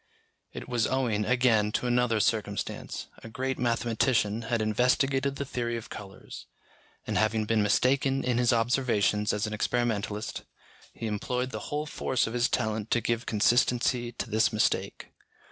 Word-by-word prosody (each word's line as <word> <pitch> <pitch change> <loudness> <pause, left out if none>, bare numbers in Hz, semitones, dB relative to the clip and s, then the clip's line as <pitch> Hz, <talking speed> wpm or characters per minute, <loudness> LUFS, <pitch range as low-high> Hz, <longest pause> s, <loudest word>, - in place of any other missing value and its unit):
It - - -8
was 120 -2 +1
owing, 120 -6 0
again, 120 -5 +3
to - - -1
another 120 -2 +2
circumstance: 105 -1 -2 0.2
a 115 - -8
great 130 +3 -3
mathematician 115 -2 +1
had 115 0 -1
investigated 135 +5 +1
the 140 - -4
theory 120 -3 -2
of 115 - -9
colours, 95 - -10 0.6
and - - 0
having 110 0 +1
been 110 0 +2
mistaken 135 +5 +2
in 125 -1 +1
his 125 0 +3
observations 115 -3 +1
as 105 +1 -1
an 105 - -4
experimentalist, 110 -1 -1 0.5
he - - -7
employed 125 +4 -2
the - - -6
whole 150 +1 -2
force 130 -4 -1
of 115 - -5
his 120 0 +1
talent 110 -2 -1
to 120 - +3
give 115 +1 -2
consistency 120 +2 +2
to - - -4
this 110 +2 +2
mistake. 110 -1 -1
115 Hz, 155 wpm, -28 LUFS, 110-125 Hz, 0.6 s, again